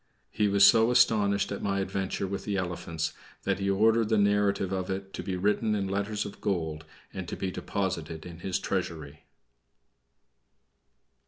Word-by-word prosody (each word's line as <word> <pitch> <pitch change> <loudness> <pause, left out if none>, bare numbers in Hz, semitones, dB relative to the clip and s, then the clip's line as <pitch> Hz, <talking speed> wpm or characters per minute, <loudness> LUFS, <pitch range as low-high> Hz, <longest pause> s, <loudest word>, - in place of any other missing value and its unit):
He 105 - +1
was 100 0 +6
so 115 +1 +6
astonished 105 -5 +3
at 100 - -4
my 100 -1 0
adventure 95 0 -2
with 100 +1 -4
the 100 -2 -2
elephants 85 -3 -3 0.3
that - - 0
he 100 0 0
ordered 110 +3 +3
the 110 - +3
narrative 100 -2 +2
of 95 -1 -2
it 95 0 -4
to - - -4
be 95 -2 -3
written 105 +3 +1
in 100 -2 -1
letters 100 +2 -2
of 100 - -9
gold 80 -5 -2 0.3
and 95 -2 -5
to - - -4
be 95 -1 -2
deposited 85 -6 -3
in 85 -1 -9
his 95 +1 -1
treasury. 80 -6 -4
100 Hz, 165 wpm, -28 LUFS, 90-100 Hz, 0.3 s, was